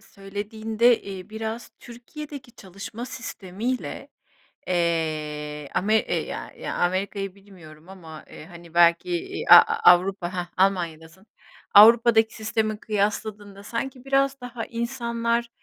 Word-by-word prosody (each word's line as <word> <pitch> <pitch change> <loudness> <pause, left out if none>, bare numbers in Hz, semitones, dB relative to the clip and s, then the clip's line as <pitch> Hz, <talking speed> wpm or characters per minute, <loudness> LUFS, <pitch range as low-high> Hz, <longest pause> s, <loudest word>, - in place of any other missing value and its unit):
söylediğinde, 215 +4 -1
eee, 195 0 -9
biraz 220 +2 -5
Türkiye'deki 265 +2 -10
çalışma 200 +4 -8
sistemiyle, 230 0 -5 0.6
eee, 155 -4 -2
ame 215 +4 +1
e 220 - +1
ya - - -5
ya - - -5
Amerika'yı 195 +2 -2
bilmiyorum 175 -5 -16
ama, 165 -5 -11
eee, - - -11
hani, 170 -1 -14
belki, 170 - +4
eee, 375 +3 -4
a - - +12
a 455 0 +6
Avrupa 185 0 0
Hah, 180 -1 -3
Almanya'dasın. 175 -2 -1 0.5
Avrupa'daki 225 +1 +7
sistemi 215 -1 -2
kıyasladığında 205 -1 -3
sanki 250 +4 -5
biraz 275 0 +1
daha 245 -2 -6
insanlar, 235 -1 -2
205 Hz, 115 wpm, -24 LUFS, 180-235 Hz, 0.6 s, a